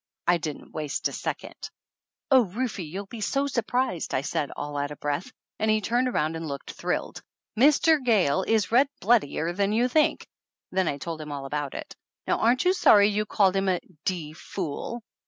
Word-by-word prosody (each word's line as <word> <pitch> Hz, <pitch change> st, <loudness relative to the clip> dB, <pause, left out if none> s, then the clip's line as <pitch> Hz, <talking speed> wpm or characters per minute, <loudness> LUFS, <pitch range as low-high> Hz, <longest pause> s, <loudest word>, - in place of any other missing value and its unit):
I 175 Hz, 0 st, +3 dB
didn't 150 Hz, -2 st, -6 dB
waste 150 Hz, -2 st, -2 dB
a -, -, -9 dB
second. -, -, -5 dB, 0.6 s
"Oh, 260 Hz, -3 st, +6 dB
Rufe, 220 Hz, +3 st, -3 dB
you'll 185 Hz, +4 st, -5 dB
be 220 Hz, +3 st, -9 dB
surprised!" 250 Hz, -, -1 dB
I 130 Hz, -, +1 dB
said, 145 Hz, 0 st, -2 dB
all 145 Hz, 0 st, -5 dB
out 145 Hz, 0 st, -1 dB
of 150 Hz, -, -9 dB
breath, 145 Hz, -, -2 dB, 0.3 s
and 220 Hz, -, +1 dB
he 215 Hz, 0 st, +4 dB
turned 240 Hz, +5 st, +1 dB
around 160 Hz, -10 st, 0 dB
and 165 Hz, 0 st, -5 dB
looked 140 Hz, -1 st, -6 dB
thrilled. -, -, -3 dB, 0.3 s
"Mr. 290 Hz, +4 st, +4 dB
Gayle 190 Hz, -, +3 dB
is 215 Hz, 0 st, +1 dB
red 260 Hz, +4 st, +5 dB
bloodier 175 Hz, -6 st, +2 dB
than 200 Hz, +2 st, +1 dB
you 235 Hz, +3 st, +3 dB
think!" 300 Hz, +4 st, +2 dB, 0.5 s
Then 185 Hz, -1 st, +1 dB
I 140 Hz, -, -1 dB
told 160 Hz, +2 st, -5 dB
him 150 Hz, -1 st, -7 dB
all 140 Hz, -1 st, -5 dB
about 145 Hz, 0 st, -3 dB
it. -, -, -7 dB, 0.3 s
"Now -, -, +1 dB
aren't 245 Hz, +5 st, +3 dB
you 365 Hz, -, +5 dB
sorry 205 Hz, -, +6 dB
you 210 Hz, 0 st, -1 dB
called 195 Hz, -2 st, +3 dB
him 195 Hz, 0 st, +1 dB
a 180 Hz, -2 st, +1 dB, 0.3 s
d 165 Hz, -5 st, -2 dB
fool?" 190 Hz, +8 st, -5 dB
195 Hz, 190 wpm, -26 LUFS, 155-235 Hz, 0.6 s, Oh